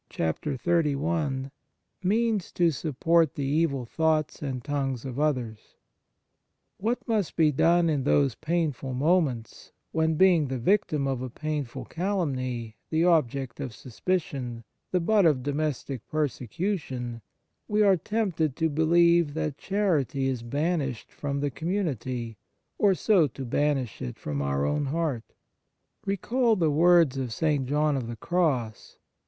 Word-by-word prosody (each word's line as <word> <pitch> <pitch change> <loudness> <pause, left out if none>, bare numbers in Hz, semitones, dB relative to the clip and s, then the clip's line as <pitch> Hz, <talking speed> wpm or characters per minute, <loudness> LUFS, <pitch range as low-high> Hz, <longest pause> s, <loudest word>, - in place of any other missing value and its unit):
73 150 - 0
XXXI 140 -3 -1 0.5
MEANS 215 +1 +1
TO 170 -2 +2
SUPPORT 160 +2 +1
THE 140 - -2 0.2
EVIL 140 -6 0
THOUGHTS 155 +3 0
AND 130 -4 -4
TONGUES 135 -3 -2
OF 130 0 -5
OTHERS 125 -8 -2 1.0
WHAT 230 +5 -2
must 215 -6 0
be 155 -2 +4
done 170 +4 +3
in 145 -4 0
those 140 -2 +3
painful 155 -4 -2
moments 140 -6 0 0.2
when, 160 0 +1
being 175 -4 +4
the 130 0 -3
victim 150 - +1
of 130 -2 -2
a 130 - -4
painful 150 -1 -4
calumny, 130 - -2
the 160 +1 +2
object 140 -7 +1
of 130 -6 -5
suspicion, 130 -3 -3 0.3
the 180 - +1
butt 200 +1 +4
of 135 -5 +2
domestic 145 -3 -3
persecution, 145 - -3 0.5
we 210 0 +2
are 195 -2 +6
tempted 175 - -1
to 160 0 +1
believe 170 0 +3
that 155 -3 -2
charity 165 - 0
is 130 -3 -2
banished 140 0 -2
from 140 -1 -3
the 145 -1 -1
community, 130 - -3 0.4
and 195 -3 +5
so 190 -8 +4
to 135 +1 -7
banish 135 -2 0
it 60 - -5
from 70 -1 -3
our 70 0 0
own 140 - 0
heart? 145 -5 -2 0.7
Recall 230 +4 +1
the 165 -6 +2
words 165 -3 +4
of 125 -3 -3
St. 145 -1 0
John 150 +1 +2
of 130 -4 -3
the 120 - -5
Cross. 130 -7 -1
150 Hz, 135 wpm, -27 LUFS, 130-170 Hz, 1.0 s, are